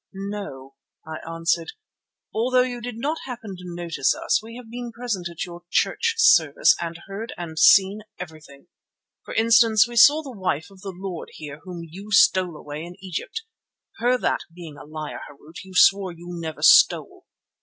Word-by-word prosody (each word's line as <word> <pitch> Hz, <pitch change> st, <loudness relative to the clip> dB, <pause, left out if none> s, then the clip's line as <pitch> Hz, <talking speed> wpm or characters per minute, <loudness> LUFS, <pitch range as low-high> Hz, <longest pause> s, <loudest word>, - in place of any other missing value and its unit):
"No," 195 Hz, -10 st, -7 dB, 0.3 s
I 160 Hz, 0 st, -6 dB
answered. 165 Hz, 0 st, -1 dB, 0.6 s
"Although 250 Hz, +3 st, +2 dB
you 245 Hz, -1 st, -5 dB
did 240 Hz, -1 st, -6 dB
not 300 Hz, +7 st, -2 dB
happen 230 Hz, -5 st, -7 dB
to 180 Hz, -, -12 dB
notice 170 Hz, -6 st, 0 dB
us, -, -, 0 dB
we 225 Hz, +1 st, -11 dB
have 250 Hz, -2 st, -11 dB
been 240 Hz, 0 st, -6 dB
present 220 Hz, -7 st, -4 dB
at 170 Hz, -1 st, -5 dB
your 175 Hz, -1 st, -10 dB
church 460 Hz, -, +1 dB
service, 460 Hz, -4 st, +5 dB
and 170 Hz, 0 st, -5 dB
heard 200 Hz, +4 st, -7 dB
and 160 Hz, -2 st, -6 dB
seen 195 Hz, +5 st, +6 dB, 0.2 s
everything. 155 Hz, -5 st, -11 dB, 0.6 s
For -, -, -8 dB
instance, 225 Hz, -1 st, +5 dB
we 240 Hz, -, -9 dB
saw 295 Hz, +6 st, +6 dB
the 275 Hz, -, -8 dB
wife 180 Hz, -3 st, -2 dB
of 190 Hz, -1 st, -17 dB
the 200 Hz, -, -6 dB
lord 185 Hz, -1 st, -7 dB
here 150 Hz, -1 st, -9 dB
whom 175 Hz, -2 st, -7 dB
you 195 Hz, +6 st, -11 dB
stole 185 Hz, -4 st, +4 dB
away 150 Hz, +1 st, -7 dB
in 175 Hz, +1 st, -10 dB
Egypt, 190 Hz, -, -5 dB, 0.5 s
her 245 Hz, +2 st, +2 dB
that, -, -, 0 dB
being 165 Hz, -3 st, -10 dB
a 140 Hz, -, -12 dB
liar, 155 Hz, 0 st, -7 dB
Harût, 150 Hz, +3 st, -13 dB
you 190 Hz, 0 st, -13 dB
swore 195 Hz, 0 st, +5 dB
you 170 Hz, +1 st, -12 dB
never 165 Hz, -2 st, -6 dB
stole. -, -, +5 dB
185 Hz, 175 wpm, -23 LUFS, 165-230 Hz, 0.6 s, seen